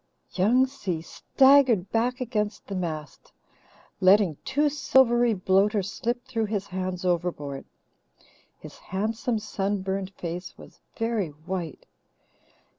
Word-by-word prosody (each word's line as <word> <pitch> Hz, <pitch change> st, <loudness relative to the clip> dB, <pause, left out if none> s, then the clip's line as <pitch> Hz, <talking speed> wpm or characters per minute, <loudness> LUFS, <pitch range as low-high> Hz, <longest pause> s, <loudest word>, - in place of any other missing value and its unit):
Young 230 Hz, +8 st, +4 dB
Si 205 Hz, -11 st, -4 dB
staggered 265 Hz, -3 st, +3 dB
back 245 Hz, +2 st, 0 dB
against 215 Hz, -4 st, -2 dB
the 200 Hz, -, -7 dB
mast, 160 Hz, -5 st, -5 dB, 0.7 s
letting 185 Hz, -4 st, +4 dB
two 285 Hz, +3 st, +1 dB
silvery 245 Hz, -5 st, +3 dB
bloaters 195 Hz, +1 st, +1 dB
slip 240 Hz, +4 st, -3 dB
through 225 Hz, -3 st, -1 dB
his 205 Hz, -2 st, -2 dB
hands 185 Hz, -1 st, -4 dB
overboard. 165 Hz, -6 st, -2 dB, 0.9 s
His -, -, -12 dB
handsome, 225 Hz, +5 st, -2 dB
sunburned 195 Hz, -2 st, -2 dB
face 175 Hz, +1 st, -6 dB
was -, -, -15 dB, 0.2 s
very 225 Hz, -4 st, -1 dB
white. 165 Hz, +1 st, -6 dB
200 Hz, 110 wpm, -26 LUFS, 180-235 Hz, 0.9 s, Young